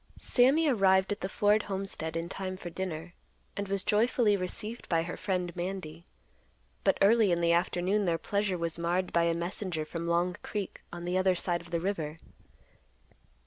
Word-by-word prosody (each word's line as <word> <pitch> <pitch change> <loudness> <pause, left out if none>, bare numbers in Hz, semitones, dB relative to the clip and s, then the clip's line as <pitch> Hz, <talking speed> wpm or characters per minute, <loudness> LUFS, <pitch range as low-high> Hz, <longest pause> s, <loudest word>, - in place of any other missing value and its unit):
Sammy 275 +6 +4
arrived 195 -6 +4
at 205 - -3
the 190 - -2
Ford 210 +2 +3
homestead 190 -5 -4
in 165 +1 -3
time 185 +1 -5
for 175 -2 -7
dinner, 170 -1 -4 0.4
and 200 0 -3
was 195 -1 -1
joyfully 220 0 +3
received 210 +5 -4
by 165 -1 +2
her 175 - -5
friend, 180 -3 -2
Mandy. 175 -2 -5 0.8
But - - +3
early 215 -1 +5
in 170 - +2
the 170 0 +3
afternoon, 180 +4 +1
their 170 -2 +1
pleasure 200 +2 -1
was 170 -1 -3
marred 175 +2 0
by 170 0 +3
a 170 0 +2
messenger 170 -1 -2
from 170 +2 -5
Long 175 +1 +1
Creek 205 -3 -5
on 175 0 -7
the 180 +1 +1
other 185 -1 +3
side 175 -1 -1
of 170 - -14
the 170 -1 -1
river. 165 -4 -2
185 Hz, 180 wpm, -30 LUFS, 170-200 Hz, 0.8 s, early